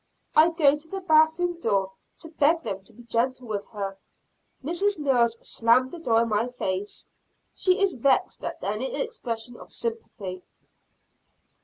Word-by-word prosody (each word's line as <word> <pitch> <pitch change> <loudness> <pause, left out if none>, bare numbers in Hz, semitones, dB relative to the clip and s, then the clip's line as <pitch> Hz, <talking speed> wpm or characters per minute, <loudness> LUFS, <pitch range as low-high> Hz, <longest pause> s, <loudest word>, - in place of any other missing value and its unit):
I 315 +2 +7
go 305 -4 +4
to 300 +2 -12
the 390 +4 -4
bath 315 -3 +4
room 350 -1 -1
door 195 - +1 0.3
to 325 - -7
beg 315 +1 +2
them 195 0 -4
to - - -13
be 240 - -14
gentle 245 +2 -1
with 205 -2 -3
her. 195 -3 -5 0.6
Mrs. 350 +7 0
Mills 245 -6 +2
slammed 245 +3 +3
the 345 - -8
door 230 -7 +3
in 230 - -3
my 215 +2 +1
face. 205 -5 -4 0.5
She 370 +1 +2
is 395 -2 +3
vexed 260 +1 +1
at - - -3
any - - -2
expression 245 - -4
of - - -13
sympathy. 210 - -5
260 Hz, 160 wpm, -26 LUFS, 225-335 Hz, 0.6 s, I